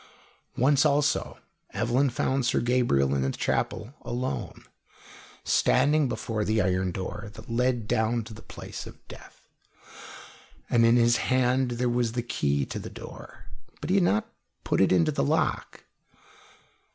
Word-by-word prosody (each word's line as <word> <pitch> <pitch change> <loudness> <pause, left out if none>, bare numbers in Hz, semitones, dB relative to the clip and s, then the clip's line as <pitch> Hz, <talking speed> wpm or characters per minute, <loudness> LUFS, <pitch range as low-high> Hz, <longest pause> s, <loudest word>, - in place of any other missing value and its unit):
Once, 135 +2 +4
also, 145 -1 +1 0.4
Evelyn 125 +4 +1
found 130 +2 0
Sir 120 - +1
Gabriel 120 - +2
in 70 - 0
the 65 - 0
chapel 115 - -2
alone, 125 +2 -4 0.8
standing 150 -1 +3
before 110 -1 -2
the 110 +1 +1
iron 95 -1 +1
door 95 +3 -5
that - - -11
led 120 -2 0
down 115 0 +1
to 110 - -10
the 110 - -11
place - - -9
of - - -15
death, - - -14 1.2
and 115 -1 +5
in 115 - +5
his 120 0 +4
hand 130 0 +1
there 125 +1 0
was 120 -1 0
the 120 -1 -2
key 70 - 0
to - - -5
the - - -7
door; - - -11 0.3
but 150 +4 -4
he 195 - +4
had 190 - +4
not 110 -11 +1 0.4
put - - +1
it 95 - +4
into 90 -3 +3
the - - 0
lock. - - -1
120 Hz, 150 wpm, -27 LUFS, 105-130 Hz, 1.2 s, and